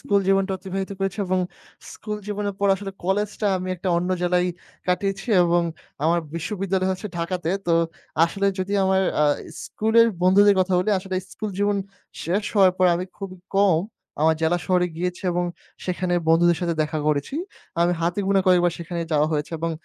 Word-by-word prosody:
School 200 -1 +2
জীবনটা 195 0 +2
অতিবাহিত 190 +1 -4
করেছি 195 +1 -2
এবং 185 0 +1 0.5
স্কুল 210 -1 -5
জীবনের 205 -1 -3
পর 200 - +3
আসলে 195 0 -6
কলেজটা 205 +3 0
আমি 185 0 -4
একটা 185 - -3
অন্য 180 +2 -1
জেলায় 180 0 +2 0.4
কাটিয়েছি 195 +4 -1
এবং 175 0 +3 0.4
আমার 170 +2 +3 0.2
বিশ্ববিদ্যালয় 190 +1 -1
হচ্ছে 185 +3 -5
ঢাকাতে। 170 0 -2 0.2
তো, 170 - +3 0.5
আসলে 200 +4 -1
যদি 190 +2 -2
আমার 190 0 +3 0.2
আ - - +5 0.4
স্কুলের 225 +2 +3 0.2
বন্ধুদের 200 +2 +6
কথা 185 0 0
বলি, 185 +4 +1
আসলে 190 0 -6 0.2
স্কুল 215 - -4
জীবন 205 0 +2 0.5
শেষ 195 +5 0
হওয়ার 190 -3 +6
পরে 185 -1 +5
আমি 180 - -3
খুবই 195 -2 -7 0.2
কম, 195 -3 +4 0.4
আমার 160 +1 +4
জেলা 165 +2 +2
শহরে 180 -1 +3
গিয়েছি 180 +2 -3
এবং 175 +1 0 0.4
সেখানে 180 -1 -1
বন্ধুদের 170 +1 +5
সাথে 170 -2 0
দেখা 155 +1 -2
করেছি। 150 - 0 0.4
আমার 170 +1 +3
হাতে 170 +3 0
গোনা 195 0 +3
কয়েকবার 175 -1 +4
সেখানে 170 0 -4
যাওয়া 150 0 +3
হয়েছে 150 +1 -2
এবং 165 +1 -1
185 Hz, 170 wpm, -23 LUFS, 175-195 Hz, 0.5 s, বন্ধুদের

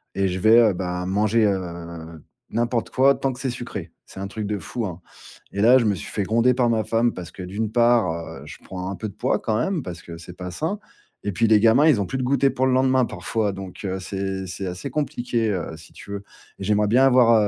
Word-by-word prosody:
et 95 0 +2
je 90 +1 -3
vais, 110 +4 +6
heu, - - -3
ben 90 0 -3
manger, 105 +3 +2
heu, 85 -4 -4 0.3
n'importe 120 +1 0
quoi 135 +2 +5
tant 135 -1 -1
que 125 - -11
c'est 135 - -2
sucré. 105 -8 -6 0.2
C'est 95 - -10
un 100 - -3
truc 105 +1 -5
de 105 - -1
fou, 115 +7 -4
hein, 90 -1 -6 0.5
et 100 - -1
là 120 +4 +7
je 115 - +1
me 105 - +2
suis 85 - -8
fait 105 - -2
gronder 115 +5 +3
par 120 -1 +2
ma 110 -2 +1
femme 115 +2 +2
parce 90 -2 -8
que 95 - -8
d'une 105 +4 -3
part, 120 -5 +4
heu, 80 -3 -7
je - - -10
prends 90 0 -6
un - - -4
peu 105 +4 -5
de 100 - -13
poids, - - 0
quand 110 -1 -1
même, 170 +3 -1
parce 85 -1 -7
que 85 -1 -9
c'est 90 +1 -11
pas 90 -1 -6
sain, 160 - -2 0.5
et 100 - -1
puis 115 +3 +2
les 110 -1 +6
gamins 115 +8 +5
ils 140 -10 +5
ont - - -1
plus 130 - -3
de - - -1
goûter 135 +1 +3
pour 130 +1 +1
le 130 - +2
lendemain, 130 0 +3
parfois, 110 -3 -2
donc, 95 -1 -8
heu, 95 0 -2
c'est 95 0 -3
c'est 95 +2 -5
assez 90 0 -5
compliqué, 120 -6 -1
heu, 85 -4 -3
si 80 +1 -14
tu 100 - -11
veux. 100 0 -5 0.4
J'aimerais 105 +2 +1
bien 125 +5 +4
avoir, 125 -3 +6
105 Hz, 250 wpm, -23 LUFS, 90-120 Hz, 0.5 s, là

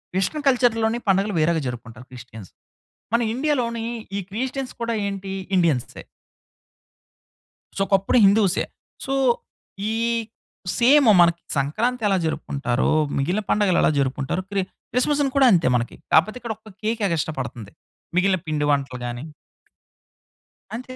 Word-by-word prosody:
విష్ణు 190 +11 0
కల్చర్‌లోని 235 -3 +2
పండుగలు, 195 +2 +2
వేరేగా 160 0 +2
జరుపుకుంటారు 120 0 -8
క్రిస్టియన్స్. 110 -6 -11 0.6
మన 235 - +3
ఇండియాలోని 245 -5 -1 0.3
ఈ - - -1
క్రిస్టియన్స్ 260 +5 -4
కూడా 230 0 -1
ఏంటి 195 -1 -5 0.3
ఇండియన్సే. 155 -9 0 1.7
సో, 195 - +2
కప్పుడు 195 +5 +3
హిందూసే. 195 -2 +3 0.4
సో, 270 - -2 0.8
ఈ - - -1 0.9
సేము 255 -1 +6
మనకి 170 0 +3 0.2
సంక్రాంతెలా 210 - 0
జరుపుకుంటారో, 140 -5 -1 0.3
మిగిలిన 175 +10 0
పండుగలెలా 200 -4 +3
జరుపుకుంటారో 135 +5 -1
క్రి 200 -1 0 0.3
క్రిస్మస్‌ని 280 +2 +1
కూడా 270 -2 +6
అంతే 170 -4 +3
మనకి. 120 -1 -2 0.2
కాపోతిక్కడొక 220 +3 0
కేకెగస్టా 200 -9 -1
పడుతుంది. 115 -4 -6 0.4
మిగిలిన 185 +1 +3
పిండి 150 -1 0
వంటలు 135 -3 -1
గాని 120 +2 -5 1.5
అంతే. 255 +2 -8
195 Hz, 110 wpm, -23 LUFS, 145-235 Hz, 1.7 s, సేము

